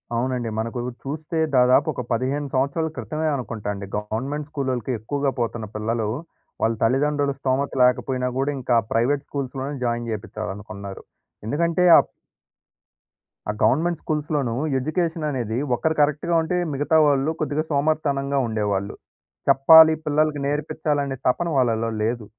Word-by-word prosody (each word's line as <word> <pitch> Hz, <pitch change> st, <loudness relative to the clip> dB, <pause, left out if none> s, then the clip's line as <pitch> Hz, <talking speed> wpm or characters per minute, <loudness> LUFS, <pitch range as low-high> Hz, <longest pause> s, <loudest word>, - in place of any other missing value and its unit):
అవునండి. 125 Hz, -1 st, -1 dB
మనకు 115 Hz, +2 st, -3 dB, 0.2 s
చూస్తే 155 Hz, +3 st, -4 dB, 0.2 s
దాదాపు 125 Hz, +4 st, +5 dB
ఒక 125 Hz, -, -4 dB
15 130 Hz, +5 st, -1 dB
సంవత్సరాల 140 Hz, +5 st, 0 dB
క్రితమే 155 Hz, 0 st, -3 dB
అనుకుంటండీ. 105 Hz, -5 st, -4 dB
గవర్నమెంట్ 130 Hz, +8 st, -4 dB
స్కూలోలకి 130 Hz, -4 st, -2 dB
ఎక్కువగా 140 Hz, +5 st, -1 dB
పోతున్న 115 Hz, -1 st, -2 dB
పిల్లలు, 110 Hz, 0 st, -1 dB, 0.5 s
వాళ్ల 115 Hz, +1 st, +2 dB
తల్లిదండ్రుల 140 Hz, +4 st, +2 dB
స్థోమత 135 Hz, +1 st, 0 dB
లేకపోయినా 125 Hz, 0 st, +1 dB
గూడా 140 Hz, +2 st, +1 dB
ఇంకా 125 Hz, -1 st, +1 dB, 0.2 s
ప్రైవేట్ 135 Hz, +5 st, +1 dB
స్కూల్స్‌లోనే 140 Hz, 0 st, -4 dB
జాయిన్ 120 Hz, 0 st, -1 dB
జేపిచాలనుకున్నారు. 100 Hz, -2 st, -6 dB, 0.4 s
ఎందుకంటే 170 Hz, +7 st, +1 dB
ఆ... -, -, +9 dB, 1.5 s
ఆ -, -, +3 dB
గవర్నమెంట్ 160 Hz, +9 st, +2 dB
స్కూల్స్‌లోనూ 150 Hz, -5 st, -1 dB, 0.3 s
ఎడ్యుకేషన్ 165 Hz, +2 st, -1 dB
అనేది 120 Hz, -4 st, -2 dB, 0.2 s
ఒక్కరు 160 Hz, +5 st, 0 dB
కరెక్ట్‌గా 150 Hz, +3 st, +1 dB
ఉంటే, 180 Hz, +3 st, -1 dB, 0.2 s
మిగతా 145 Hz, +3 st, +2 dB
వాళ్లు 140 Hz, +2 st, +2 dB
కొద్దిగా 150 Hz, +1 st, 0 dB
సోమరితనంగా 140 Hz, -2 st, 0 dB
ఉండేవాళ్లు. 105 Hz, -3 st, -2 dB, 0.6 s
చెప్పాలి, 160 Hz, +3 st, +8 dB
పిల్లలకి 150 Hz, -1 st, +1 dB
నేర్పించాలనే 145 Hz, -1 st, -1 dB
తపన 170 Hz, +7 st, +1 dB
వాళ్లలో 115 Hz, -3 st, +1 dB
లేదు. 115 Hz, +1 st, -1 dB
135 Hz, 120 wpm, -23 LUFS, 115-150 Hz, 1.5 s, ఆ